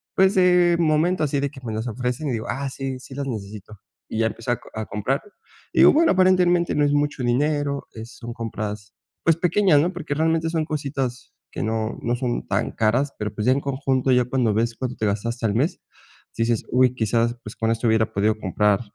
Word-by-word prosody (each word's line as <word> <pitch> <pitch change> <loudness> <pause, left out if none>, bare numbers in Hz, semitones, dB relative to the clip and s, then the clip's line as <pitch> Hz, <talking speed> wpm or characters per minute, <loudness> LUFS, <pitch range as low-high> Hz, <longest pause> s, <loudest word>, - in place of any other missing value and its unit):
pues, 190 +1 +4
de 180 -2 +5
momento 160 +2 +2
así 145 -1 0
de 140 0 -1
que 135 -3 -13
me 110 -3 -4
las 110 +3 -3
ofrecen 125 +5 -3
y - - -1
digo: 115 0 -3
"Ah, 135 +2 -2
sí, 135 -1 -5
sí 130 - -11
las 140 0 -3
necesito". 105 -3 -7 0.3
Y 110 - -3
ya 115 - +3
empecé 115 +2 -4
a 120 - +1
co - - -16
a 110 0 -4
comprar, 110 +8 -2 0.5
y - - +1
digo, - - +8
bueno, 330 +3 +4
aparentemente 180 -2 +3
no 150 - +3
es 145 - +2
mucho 145 -3 0
dinero, 140 +3 0
es 115 +2 -10
son 120 0 -7
compras, 105 -3 -5 0.3
pues, 165 -1 +3
pequeñas, 180 -2 +3
¿no?, 180 +4 0
porque, 165 -5 -4
realmente, 160 +1 +1
son 160 -2 -1
cositas 135 -5 -4 0.2
que - - -4
no 110 0 -2
no 120 +1 0
son 125 -2 -2
tan - - -1
caras, 125 +6 +1
pero, 105 0 -3
pues, 105 - -3
ya 130 - +6
en 140 - -1
conjunto 135 -1 0
ya 125 -1 +4
cuando 125 -3 +1
ves 115 +2 0
cuánto 125 -1 -3
te 110 - -1
gastaste 115 +3 -2
al 105 - +1
mes, 145 +9 0 0.6
dices: 115 -1 +1
"Uy, 125 0 +3
quizás, 115 +1 0
pues, 105 - -9
con 115 0 0
esto 115 +1 0
hubiera 110 0 +2
podido 105 +2 +1
comprar". 105 0 +1
125 Hz, 220 wpm, -23 LUFS, 115-150 Hz, 0.6 s, digo